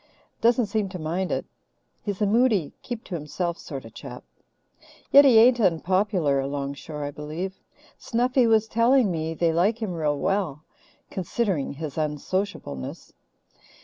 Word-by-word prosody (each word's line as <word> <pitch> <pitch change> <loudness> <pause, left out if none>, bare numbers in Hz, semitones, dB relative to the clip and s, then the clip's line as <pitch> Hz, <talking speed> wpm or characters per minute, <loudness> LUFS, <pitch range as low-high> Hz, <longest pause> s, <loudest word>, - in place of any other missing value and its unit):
Doesn't 235 +1 +4
seem 205 -1 -1
to 185 - -6
mind 175 +3 -2
it. - - -1 0.6
He's 205 0 -2
a - - +4
moody, 215 - +2
keep 240 -3 -6
to - - -9
himself 170 +2 -3
sort 135 -6 -7
of 115 - -12
chap. - - -9 0.9
Yet 280 +1 +9
he 250 -5 +7
ain't 240 +2 +6
unpopular 185 -4 +2
along 140 0 -3
shore, 150 +1 -7
I 145 - -3
believe. 155 +6 -6 0.4
Snuffy 245 +1 +2
was 220 -1 +3
telling 235 0 +3
me 160 -1 -3
they 165 0 +1
like 200 +7 +2
him 215 -6 -3
real 150 -3 0
well, 175 -5 -1 0.5
considering 190 - -1
his 155 +1 -5
unsociableness. 150 - -3
185 Hz, 145 wpm, -25 LUFS, 150-220 Hz, 0.9 s, Yet